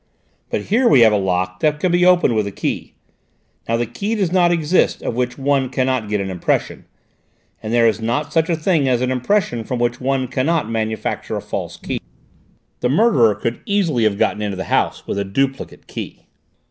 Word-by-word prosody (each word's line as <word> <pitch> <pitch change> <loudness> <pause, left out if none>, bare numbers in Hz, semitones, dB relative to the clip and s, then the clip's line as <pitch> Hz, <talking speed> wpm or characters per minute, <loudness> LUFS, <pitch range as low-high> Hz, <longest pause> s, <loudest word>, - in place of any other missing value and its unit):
But - - -1
here 240 +5 +2
we 135 - +6
have 110 -2 +6
a - - +3
lock 95 -1 -1
that 150 -1 +1
can 180 +2 +1
be 175 +1 +4
opened 175 -8 +4
with 105 -2 0
a - - -4
key. - - -4 0.7
Now 115 - +2
the 120 - 0
key 205 - -3
does 195 -6 0
not 175 -2 +3
exist 170 +1 +1
of - - -2
which 125 +1 -2
one 135 -1 +1
cannot 130 -3 -1
get 105 -1 0
an 95 -1 -3
impression, 90 -2 -2 0.8
and 110 - -5
there 120 0 +4
is 110 0 0
not 145 +7 -2
such 165 0 +2
a 170 - +2
thing 160 -3 +1
as 125 -2 +2
an 130 0 0
impression 125 - 0
from 125 +3 -3
which 120 0 -1
one 130 0 0
cannot 145 +2 0
manufacture 110 -1 -3
a - - -2
false - - -5
key. - - -4 0.8
The 125 - 0
murderer 135 - +4
could 115 +3 -4
easily 175 - +1
have 100 -2 +1
got 105 - 0
into 100 -2 -3
the 95 - -3
house - - 0
with 100 - -3
a - - 0
duplicate 135 +7 -3
key." - - -8
125 Hz, 205 wpm, -19 LUFS, 110-160 Hz, 0.8 s, we